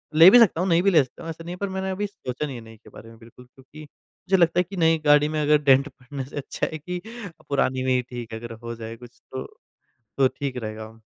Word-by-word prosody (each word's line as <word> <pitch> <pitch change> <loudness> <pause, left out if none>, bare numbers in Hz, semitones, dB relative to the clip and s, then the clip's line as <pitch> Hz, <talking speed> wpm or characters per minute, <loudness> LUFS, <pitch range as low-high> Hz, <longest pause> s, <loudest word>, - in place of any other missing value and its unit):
ले 165 +3 +10
भी 245 - +9
सकता 190 -7 +4
हूँ, 185 - 0
नई 170 0 +4
भी 195 - +3
ले 160 -5 +5
सकता 130 +6 -14
हूँ, 165 - -6
ऐसा 165 0 -7
नहीं 175 +1 -6
है - - -14
पर 200 +1 -3
मैंने 190 0 -3
अभी 205 +2 -2
सोचा 150 -8 -5
नहीं 140 -3 -6
है 120 - -8
नई 110 0 -14
के - - -18
बारे 115 - -13
में 115 - -15
बिल्कुल 120 +2 -16
क्योंकि 135 +4 -16
मुझे 185 +5 -4
लगता 175 0 +3
है - - +4
कि 195 - -7
नई 165 -1 +3
गाड़ी 150 0 +5
में 155 - 0
अगर 150 0 +4
डेंट 135 0 +5
पड़ने 130 0 -8
से 145 - -10
अच्छा 140 - -3
है - - -3
कि 180 +4 -5 0.3
अ, 175 -5 -13
पुरानी 130 -2 0
में 130 0 +1
ही 125 - +2
ठीक 120 -2 -9
है, 110 - -5
अगर 120 0 -8
हो 115 0 -5
जाए 115 0 -8
कुछ 120 0 -16
तो, 130 - -4 0.8
तो 135 -1 +5
ठीक 135 -1 -5
रहेगा। 110 -1 -7
140 Hz, 280 wpm, -24 LUFS, 125-170 Hz, 0.8 s, ले